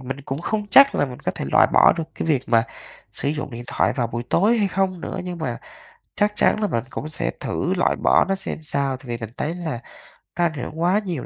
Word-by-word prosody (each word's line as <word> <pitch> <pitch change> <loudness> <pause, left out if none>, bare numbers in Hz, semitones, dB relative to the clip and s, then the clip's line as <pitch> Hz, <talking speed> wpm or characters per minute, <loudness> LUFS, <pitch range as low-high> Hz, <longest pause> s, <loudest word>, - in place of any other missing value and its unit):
mình 135 +1 -6
cũng 135 +1 -5
không 210 +4 -2
chắc 275 0 +8
là - - +2
mình 125 -1 -9
có - - -2
thể - - -4
loại - - +6
bỏ - - +7
được 165 - -2
cái - - -4
việc 140 -5 +2
mà 115 -1 +4 0.5
sử - - -2
dụng 150 0 -3
điện 120 0 -7
thoại - - +1
vào 120 -4 -1
buổi 120 +1 -4
tối 220 +6 +3
hay 200 -2 +2
không 185 -1 -1
nữa, 185 - -5
nhưng 180 -1 -5
mà 125 -7 -3 0.6
chắc 205 0 +2
chắn 215 - +2
là 210 - +2
mình 115 - -1
cũng 155 +3 -5
sẽ - - -2
thử - - -1
loại - - +1
bỏ - - +3
nó 195 0 0
xem 175 - -5
sao. 140 -3 -1
Tại 135 - -18
vì 120 - -3
mình 115 -2 -6
thấy 160 +3 -2
là 160 -9 -4 0.5
nó 175 - +1
ảnh 165 - 0
hưởng 150 +2 -6
quá 185 +4 +3
nhiều 170 -9 -3
155 Hz, 255 wpm, -22 LUFS, 130-185 Hz, 0.6 s, chắc